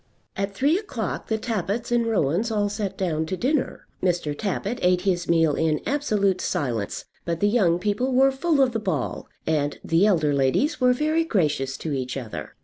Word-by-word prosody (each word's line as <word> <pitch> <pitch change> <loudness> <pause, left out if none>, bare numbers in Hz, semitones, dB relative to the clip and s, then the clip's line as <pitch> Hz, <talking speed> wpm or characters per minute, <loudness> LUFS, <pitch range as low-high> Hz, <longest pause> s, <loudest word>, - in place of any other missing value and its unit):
At 195 0 -3
three 295 - +2
o'clock 235 - -4
the 220 - 0
Tappitts 220 +1 -2
and 235 -1 +2
Rowans 200 - +1
all 205 -2 0
sat 205 -2 -4
down 160 -4 -1
to 185 - -3
dinner. 270 +4 -1 0.2
Mr. 175 -5 0
Tappitt 205 +5 -3
ate 180 0 +3
his 180 -3 -1
meal 165 -3 +4
in 155 0 +1
absolute 210 -10 +1
silence; 115 -7 -2 0.2
but 170 -1 -2
the 205 - +3
young 200 -6 +3
people 210 +8 -1
were 265 +1 +5
full 280 +1 +2
of 255 - +1
the 225 - -2
ball, 180 - -3 0.2
and 145 -2 0
the 170 +5 +3
elder 155 -8 +2
ladies 140 - +1
were 250 0 +5
very 310 +5 +1
gracious 150 - 0
to 155 - -4
each 130 -1 -3
other. 120 -5 -7
195 Hz, 185 wpm, -24 LUFS, 160-240 Hz, 0.2 s, were